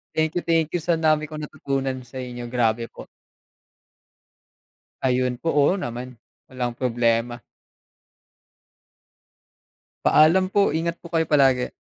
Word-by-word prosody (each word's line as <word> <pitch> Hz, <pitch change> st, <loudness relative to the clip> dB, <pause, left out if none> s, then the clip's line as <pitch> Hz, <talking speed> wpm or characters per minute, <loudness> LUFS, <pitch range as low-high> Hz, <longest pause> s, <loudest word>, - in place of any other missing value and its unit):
Thank 160 Hz, +1 st, 0 dB
you, 175 Hz, -, -3 dB
thank 165 Hz, -2 st, +2 dB
you 175 Hz, -, -1 dB
sa 170 Hz, +1 st, 0 dB
dami 155 Hz, -1 st, +2 dB
kong 155 Hz, 0 st, -8 dB
natutunan 135 Hz, -3 st, -3 dB
sa 130 Hz, +1 st, -8 dB
inyo. 120 Hz, -1 st, -7 dB
Grabe 120 Hz, -1 st, 0 dB
po. -, -, -12 dB, 2.0 s
Ayun 125 Hz, -1 st, 0 dB
po. 165 Hz, -, -1 dB
Oo 145 Hz, +1 st, +3 dB
naman, 125 Hz, -2 st, -6 dB, 0.4 s
walang 125 Hz, -2 st, -3 dB
problema. 120 Hz, -1 st, 0 dB, 2.6 s
Paalam 185 Hz, +5 st, +5 dB
po. 200 Hz, -6 st, +2 dB
Ingat 170 Hz, +1 st, -2 dB
po 170 Hz, -, -11 dB
kayo 165 Hz, -1 st, +1 dB
palagi. 135 Hz, -5 st, +3 dB
135 Hz, 120 wpm, -23 LUFS, 125-160 Hz, 2.6 s, Paalam